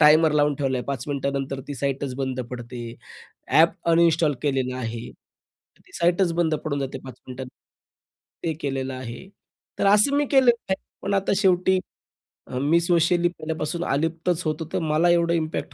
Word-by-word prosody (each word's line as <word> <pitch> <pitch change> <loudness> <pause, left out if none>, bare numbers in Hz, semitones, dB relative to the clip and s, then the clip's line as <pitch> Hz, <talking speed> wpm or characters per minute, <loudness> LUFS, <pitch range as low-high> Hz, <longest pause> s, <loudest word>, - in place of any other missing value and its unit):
Timer 155 +1 +6
लावून 150 -1 +3
ठेवला 135 -3 0
आहे. 125 - -5
5 135 -3 -3
मिनिटानंतर 140 -1 -2
ती 145 - -4
साईटच 135 0 -2
बंद 130 -1 -2
पडते. 120 0 -7 0.7
ॲप 165 +1 +5 0.2
अनइंस्टॉल 165 -2 +4
केलेला 130 -3 0
आहे. 115 -2 -4 0.8
तर - - -28
ती - - -22
साईटतच 175 +1 +2
बंद 165 -2 +1
पडून 145 -2 -1
जाते 135 -1 -4
5 130 -2 -8
मिनिटां 130 +1 -7 1.0
ते 165 - +1
केलेलं 135 -2 -2
आहे. 130 +7 -8 0.5
तर - - +2
असं 210 +8 +5
मी 290 - +3
केलेलं 255 -4 +4
आहे, 190 - +4 0.3
पण 200 - -1
आता 195 0 +1
शेवटी 190 -1 +3 0.7
अ, 125 - -5
मी 150 +5 +3
सोशली 170 0 +3
पहिल्यापासून 160 0 -4
अलिप्तच 165 +4 0
होतो, 155 +1 -2
तर - - +1
मला 160 +2 +2
एवढं 170 -1 +3
इम्पॅक्ट 160 -1 -2
155 Hz, 165 wpm, -24 LUFS, 135-170 Hz, 1.0 s, Timer